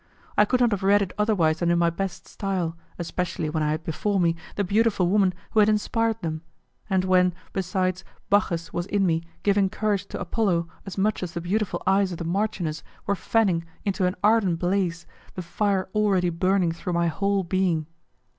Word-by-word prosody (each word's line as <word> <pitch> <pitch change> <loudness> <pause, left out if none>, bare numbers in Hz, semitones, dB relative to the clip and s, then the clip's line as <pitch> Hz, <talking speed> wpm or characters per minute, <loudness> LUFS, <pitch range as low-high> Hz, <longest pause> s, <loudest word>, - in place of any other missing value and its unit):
I 210 - +5
could 255 +4 +1
not 240 -2 +4
have 205 - -1
read 200 +1 +4
it 185 - -6
otherwise 180 -7 +2
than 175 - +1
in 170 - +3
my 170 0 +3
best 190 +1 -4
style, 185 -5 -2 0.2
especially 175 -2 -3
when 155 0 -1
I 150 - +1
had 155 +1 -2
before 195 +5 -1
me 170 -2 +2 0.2
the 205 - 0
beautiful 200 -1 +2
woman 195 0 +3 0.2
who 220 - +3
had 210 0 +6
inspired 225 +1 0
them, 160 -1 -3 0.5
and 190 -1 +2
when, 180 -1 +3 0.2
besides, 185 -1 -1 0.2
Bacchus 170 -5 +1
was 175 +1 -2
in 200 -1 +1
me 165 -2 +1 0.2
giving 200 -1 +3
courage 205 -1 -1
to - - -6
Apollo 175 -3 0 0.2
as 195 - -7
much 210 +2 +1
as 180 -2 -4
the - - -1
beautiful 200 +3 -1
eyes 195 0 +3
of 175 - -5
the 170 - -4
marchioness 175 -3 -1 0.2
were 200 - +1
fanning 190 -3 +1 0.2
into 195 -2 +1
an 180 - -2
ardent 205 -5 +3
blaze 175 -1 -1 0.3
the 185 - -4
fire 195 +2 0
already 195 -5 +2
burning 185 +1 +2
through 170 +2 -4
my 170 0 +2
whole 200 +4 0
being. 175 -3 0
185 Hz, 195 wpm, -25 LUFS, 170-205 Hz, 0.5 s, had